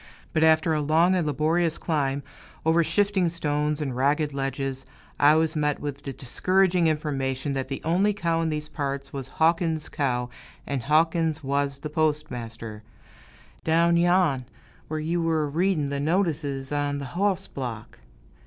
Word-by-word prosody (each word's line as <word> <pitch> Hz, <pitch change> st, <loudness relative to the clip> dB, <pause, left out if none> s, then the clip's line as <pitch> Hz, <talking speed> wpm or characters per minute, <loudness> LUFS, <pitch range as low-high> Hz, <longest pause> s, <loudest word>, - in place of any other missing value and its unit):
But 155 Hz, -, +2 dB
after 160 Hz, 0 st, +4 dB
a 155 Hz, -, +1 dB
long 160 Hz, +5 st, +3 dB
and 175 Hz, -4 st, +1 dB
laborious 160 Hz, +3 st, +1 dB
climb, 140 Hz, -4 st, -1 dB, 0.4 s
over 165 Hz, +1 st, +4 dB
shifting 190 Hz, +2 st, +1 dB
stones 150 Hz, -2 st, -1 dB
and 135 Hz, -5 st, -3 dB
ragged 145 Hz, +3 st, +1 dB
ledges, 135 Hz, -1 st, -3 dB, 0.4 s
I 145 Hz, +1 st, +6 dB
was 160 Hz, 0 st, +1 dB
met 150 Hz, -1 st, 0 dB
with 145 Hz, -1 st, -5 dB
the 140 Hz, -, -5 dB
discouraging 180 Hz, +7 st, +2 dB
information 140 Hz, -3 st, -1 dB
that 135 Hz, -1 st, -2 dB
the 135 Hz, 0 st, -5 dB
only 185 Hz, +6 st, +3 dB
cow 170 Hz, -5 st, 0 dB
in 165 Hz, -, 0 dB
these 150 Hz, -1 st, -3 dB
parts 140 Hz, -2 st, -4 dB
was 135 Hz, -2 st, -5 dB
Hawkins' 160 Hz, 0 st, +1 dB
cow, 125 Hz, -3 st, -1 dB, 0.3 s
and 140 Hz, -3 st, -2 dB
Hawkins 160 Hz, +2 st, +2 dB
was 140 Hz, 0 st, 0 dB
the 150 Hz, +1 st, -7 dB
postmaster, 120 Hz, -8 st, -2 dB, 0.8 s
"down 170 Hz, +1 st, +3 dB
yon, 170 Hz, -6 st, +3 dB, 0.4 s
whar 155 Hz, 0 st, -2 dB
yew 165 Hz, +3 st, -1 dB
were 160 Hz, -2 st, +1 dB
a 145 Hz, -, -5 dB
read'n' 160 Hz, -3 st, +1 dB
th' 140 Hz, 0 st, -2 dB
notices 150 Hz, -5 st, -1 dB
on 145 Hz, -1 st, 0 dB
th' -, -, -5 dB
hoss 195 Hz, +2 st, 0 dB
block." 120 Hz, -, -7 dB
150 Hz, 155 wpm, -25 LUFS, 140-165 Hz, 0.8 s, I